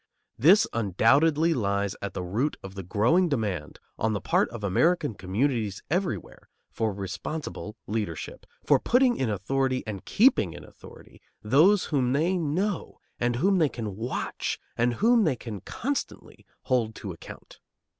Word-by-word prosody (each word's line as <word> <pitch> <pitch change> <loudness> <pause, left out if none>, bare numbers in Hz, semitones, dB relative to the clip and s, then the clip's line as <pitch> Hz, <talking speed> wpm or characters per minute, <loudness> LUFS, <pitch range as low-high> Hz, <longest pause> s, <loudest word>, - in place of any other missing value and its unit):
This 185 - +6
undoubtedly 140 - +3
lies 100 - -1
at 100 - -5
the 90 - -3
root 115 +12 -1
of 95 0 -8
the 95 - -6
growing 115 - +2
demand 105 - -3 0.2
on 110 0 +1
the 105 - -1
part - - +1
of 115 -3 -8
American 145 - +2
communities 105 +1 -1
everywhere 175 - -3 0.2
for 110 -1 -1
responsible 105 - -5
leadership, 105 -7 -4 0.2
for - - +4
putting 250 0 +3
in 130 - -1
authority 130 +6 -1
and 105 -4 -6
keeping 205 - +3
in - - -10
authority - - -15 0.2
those 160 - +4
whom 130 -3 +2
they 165 +6 +1
know 180 +4 -2 0.2
and 120 0 +1
whom 190 +8 +2
they 155 -3 +3
can 110 -6 -5
watch 115 +5 -3 0.2
and 120 +1 +1
whom 230 - +4
they 155 -8 +2
can 110 -5 -7
constantly 275 - -5 0.2
hold 115 -4 0
to 100 - -6
account. 85 - -12
120 Hz, 150 wpm, -27 LUFS, 100-160 Hz, 0.2 s, This